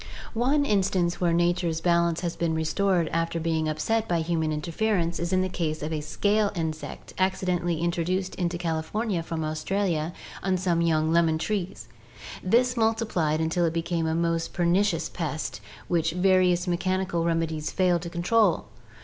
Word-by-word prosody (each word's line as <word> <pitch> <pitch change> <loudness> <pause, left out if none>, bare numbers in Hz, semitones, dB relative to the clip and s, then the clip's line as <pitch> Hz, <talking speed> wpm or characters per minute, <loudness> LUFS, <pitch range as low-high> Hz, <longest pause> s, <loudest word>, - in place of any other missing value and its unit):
One 270 +5 +2
instance 190 -6 +1
where 175 -1 +3
nature's 175 -1 +1
balance 170 -1 +2
has 175 -1 -2
been 165 -1 0
restored 170 +2 +1
after 165 0 -1
being 160 -1 0
upset 220 +9 0
by 170 -2 +1
human 160 -1 0
interference 170 +3 -1
is 170 +1 -2
in 185 0 +3
the - - 0
case 155 -4 -3
of 155 +1 -3
a 155 - -2
scale 205 +7 +1
insect 160 -2 -5
accidentally 180 -3 0
introduced 175 +2 -1
into 175 -1 -2
California 170 +4 -2
from 165 -1 -4
Australia 155 +1 -1 0.3
on 190 -1 +1
some 175 -2 +1
young 160 -1 +2
lemon 165 -2 +3
trees. 195 +1 -3 0.5
This 245 +6 +2
multiplied 220 -9 +1
until 160 +2 +1
it 165 -1 +1
became 165 0 -1
a 160 - 0
most 165 0 0
per 175 - 0
nicious 175 -2 +2
pest 155 -3 -4 0.3
which 165 -2 +1
various 180 -1 +3
mechanical 185 -1 0
remedies 165 -2 -1
failed 180 -3 +2
to 170 - -5
control. 175 +3 +2
170 Hz, 160 wpm, -26 LUFS, 165-185 Hz, 0.5 s, where